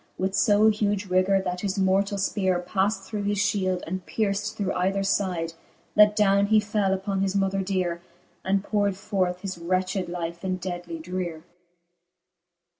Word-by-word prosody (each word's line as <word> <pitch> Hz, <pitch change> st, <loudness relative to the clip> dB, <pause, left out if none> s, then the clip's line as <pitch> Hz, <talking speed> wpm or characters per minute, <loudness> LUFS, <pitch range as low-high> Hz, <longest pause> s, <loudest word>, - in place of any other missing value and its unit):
With 190 Hz, +1 st, -1 dB
{o 210 Hz, +1 st, +6 dB
huge 205 Hz, -1 st, 0 dB
rigour, 185 Hz, +1 st, +3 dB
that 180 Hz, -1 st, -3 dB
his 200 Hz, -1 st, -2 dB
mortall 195 Hz, +1 st, +2 dB
fpeare 190 Hz, -2 st, 0 dB
Pad 190 Hz, +3 st, +1 dB
through 200 Hz, +2 st, -6 dB
his 205 Hz, 0 st, -1 dB
fhield, 195 Hz, -3 st, 0 dB
and 185 Hz, +2 st, -4 dB
pierft 210 Hz, 0 st, -1 dB
through 195 Hz, -2 st, -1 dB
either 190 Hz, +2 st, 0 dB
f)'dc, 180 Hz, -4 st, 0 dB, 0.4 s
That 210 Hz, 0 st, +6 dB
downe 200 Hz, -1 st, +3 dB
he 215 Hz, +1 st, +5 dB
fell 205 Hz, -2 st, 0 dB
uppon 195 Hz, 0 st, -2 dB
his 195 Hz, 0 st, 0 dB
mother 195 Hz, 0 st, +1 dB
deare, 185 Hz, -3 st, -1 dB, 0.4 s
And 195 Hz, +1 st, +1 dB
powred 205 Hz, -2 st, 0 dB
forth 185 Hz, -3 st, -1 dB
his 190 Hz, -3 st, -5 dB
wretched 185 Hz, +1 st, -1 dB
life 170 Hz, 0 st, -5 dB
in 185 Hz, -1 st, -1 dB
deadly 175 Hz, -2 st, -5 dB
dreare. 170 Hz, -1 st, -5 dB
195 Hz, 160 wpm, -25 LUFS, 185-205 Hz, 0.4 s, o